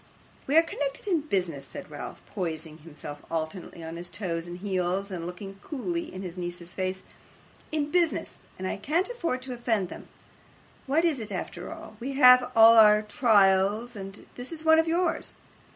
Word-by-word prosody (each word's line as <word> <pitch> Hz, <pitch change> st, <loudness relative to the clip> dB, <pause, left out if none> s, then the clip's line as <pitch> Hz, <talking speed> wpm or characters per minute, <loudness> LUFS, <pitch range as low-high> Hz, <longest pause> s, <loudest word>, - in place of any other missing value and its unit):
'We 285 Hz, +4 st, +3 dB
are 325 Hz, -, +8 dB
connected 285 Hz, -4 st, -4 dB
in 345 Hz, -6 st, +2 dB
business,' 180 Hz, -, -2 dB
said -, -, -9 dB
Ralph, -, -, -8 dB
poising 160 Hz, -4 st, -4 dB
himself 150 Hz, -2 st, -8 dB
alternately 165 Hz, +1 st, -4 dB
on 165 Hz, +1 st, -6 dB
his 175 Hz, +1 st, -6 dB
toes 175 Hz, -2 st, -3 dB
and 175 Hz, 0 st, -6 dB
heels, 190 Hz, 0 st, -1 dB
and 170 Hz, -2 st, -4 dB
looking 195 Hz, +2 st, -8 dB
coolly 335 Hz, +4 st, -3 dB
in 185 Hz, -, -7 dB
his 180 Hz, -1 st, -6 dB
niece's 175 Hz, 0 st, -5 dB
face, 185 Hz, 0 st, -3 dB, 0.7 s
'in 300 Hz, -1 st, -1 dB
business, 345 Hz, -1 st, 0 dB, 0.2 s
and 185 Hz, -, -4 dB
I -, -, -2 dB
can't 325 Hz, -, 0 dB
afford 335 Hz, -, -2 dB
to 260 Hz, -1 st, -4 dB
offend 225 Hz, -6 st, 0 dB
them. -, -, -9 dB, 0.8 s
What 310 Hz, +5 st, +3 dB
is 310 Hz, -6 st, +2 dB
it 215 Hz, -2 st, -6 dB
after 180 Hz, -1 st, -5 dB
all? 220 Hz, -1 st, -10 dB
We 265 Hz, +3 st, -4 dB
have 250 Hz, -2 st, +7 dB
all 225 Hz, 0 st, +9 dB
our 210 Hz, 0 st, +7 dB
trials, 210 Hz, +1 st, +3 dB
and 195 Hz, 0 st, -8 dB
this 250 Hz, +4 st, -7 dB
is 320 Hz, -1 st, -7 dB
one 320 Hz, 0 st, +7 dB
of 325 Hz, -, +2 dB
yours. 335 Hz, 0 st, 0 dB
210 Hz, 180 wpm, -27 LUFS, 180-275 Hz, 0.8 s, all